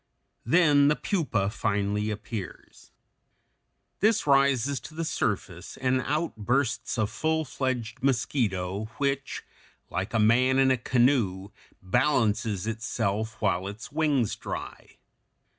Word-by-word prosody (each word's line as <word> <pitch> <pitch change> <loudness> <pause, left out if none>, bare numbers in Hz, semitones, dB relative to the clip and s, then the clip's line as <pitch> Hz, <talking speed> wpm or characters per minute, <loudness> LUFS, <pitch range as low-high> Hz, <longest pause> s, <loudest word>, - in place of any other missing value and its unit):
Then 145 -1 +5
the 150 - +4
pupa 145 - -1
finally 105 -1 -1
appears. 105 -3 -7 1.1
This 215 +2 +3
rises 140 -1 +3
to 155 - -12
the 165 +1 -2
surface, 95 - -3
and 130 0 +1
out 155 +3 -1
bursts 120 +4 -1
a 110 - +2
full 160 +8 -1
fledged 125 -4 -3
mosquito 110 -7 0
which, 140 -1 -2 0.5
like 95 +6 -3
a - - +3
man 125 +5 +4
in 135 0 +4
a - - +4
canoe, 120 -6 +1 0.3
balances 110 -3 +1
itself 110 -1 -2
while 95 -2 +1
its 105 +8 -8
wings 145 -7 +1
dry. - - -7
120 Hz, 115 wpm, -27 LUFS, 105-140 Hz, 1.1 s, Then